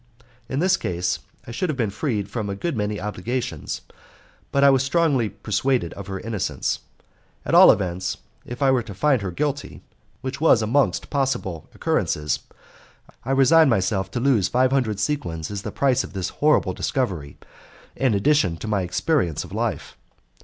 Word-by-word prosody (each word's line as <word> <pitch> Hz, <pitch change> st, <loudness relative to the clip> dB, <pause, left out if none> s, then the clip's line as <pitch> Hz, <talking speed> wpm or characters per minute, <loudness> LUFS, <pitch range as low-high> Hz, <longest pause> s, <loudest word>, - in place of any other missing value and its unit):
In 130 Hz, -, -2 dB
this 180 Hz, +4 st, +3 dB
case 90 Hz, -1 st, -2 dB, 0.3 s
I -, -, -8 dB
should 175 Hz, +10 st, -2 dB
have 150 Hz, -, -2 dB
been 115 Hz, -6 st, 0 dB
freed 105 Hz, -3 st, -2 dB
from 105 Hz, -1 st, -4 dB
a 100 Hz, -, -3 dB
good 165 Hz, -, -3 dB
many 105 Hz, -2 st, -2 dB
obligations, 105 Hz, +5 st, -4 dB, 0.7 s
but 140 Hz, -, +2 dB
I 140 Hz, -, +8 dB
was 135 Hz, -1 st, +3 dB
strongly 135 Hz, -5 st, +2 dB
persuaded 105 Hz, 0 st, -1 dB
of 100 Hz, -1 st, -9 dB
her 95 Hz, -1 st, -4 dB
innocence. 110 Hz, -2 st, -2 dB, 0.7 s
At -, -, -2 dB
all -, -, +9 dB
events, 90 Hz, -1 st, -2 dB, 0.3 s
if 120 Hz, +3 st, -5 dB
I 135 Hz, -, +5 dB
were 130 Hz, -2 st, +2 dB
to 110 Hz, -4 st, -9 dB
find 135 Hz, +1 st, +2 dB
her 95 Hz, -, -3 dB
guilty 140 Hz, +10 st, -3 dB, 0.4 s
(which 135 Hz, +2 st, -5 dB
was 125 Hz, -8 st, +5 dB
amongst 135 Hz, +6 st, +1 dB
possible 135 Hz, -, -2 dB
occurrences), 75 Hz, 0 st, 0 dB, 0.8 s
I 130 Hz, -, -7 dB
resigned 135 Hz, +3 st, +5 dB
myself 95 Hz, -3 st, +1 dB
to 110 Hz, -, -3 dB
lose 120 Hz, -7 st, +3 dB
five 130 Hz, +1 st, +2 dB
hundred 120 Hz, -7 st, 0 dB
sequins 105 Hz, -, -2 dB
as 100 Hz, -1 st, -4 dB
the -, -, -5 dB
price 135 Hz, -1 st, +2 dB
of -, -, -10 dB
this 95 Hz, -2 st, -2 dB
horrible 150 Hz, +1 st, +2 dB
discovery 95 Hz, -, -2 dB, 0.6 s
and 130 Hz, -5 st, +1 dB
addition 100 Hz, -, +2 dB
to 110 Hz, -, -7 dB
my 105 Hz, -2 st, +1 dB
experience 90 Hz, -, 0 dB
of -, -, -12 dB
life. -, -, -3 dB
115 Hz, 170 wpm, -23 LUFS, 95-135 Hz, 0.8 s, all